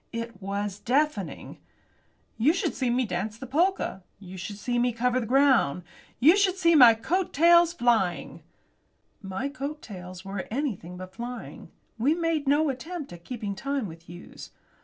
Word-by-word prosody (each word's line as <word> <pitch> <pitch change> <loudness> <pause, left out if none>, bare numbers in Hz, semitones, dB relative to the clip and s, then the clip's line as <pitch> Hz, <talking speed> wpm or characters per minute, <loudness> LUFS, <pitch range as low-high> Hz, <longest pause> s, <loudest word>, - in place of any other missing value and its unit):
It 230 -3 -6
was 200 +1 -3
deafening! 260 - -1 0.8
You 280 +8 +4
should 360 - -1
see 255 -2 -1
me 250 +1 +1
dance 205 +3 -3
the 260 - -8
polka, 330 - 0 0.2
You 190 -2 -10
should 200 +2 -6
see 240 +3 -1
me 245 0 +1
cover 250 +2 +1
the 230 - -4
ground; 255 - +3 0.4
You 315 +8 +7
should 390 -2 +2
see 335 -2 +4
my 245 -7 +8
coat 355 +11 -1
tails 340 +2 +6
flying 235 - 0 0.8
My 195 +6 -4
coat 290 +2 -6
tails 185 -2 -9
were 195 0 -5
anything 215 - -3
but 185 0 -9
flying. 240 +4 -8 0.3
We 280 +8 +3
made 330 -4 -1
no 295 +2 +3
attempt 300 - -7
at 170 -1 -12
keeping 215 -2 -5
time 275 +3 -3
with 165 -1 -13
Hughes. 175 +1 -11
245 Hz, 160 wpm, -26 LUFS, 195-295 Hz, 0.8 s, my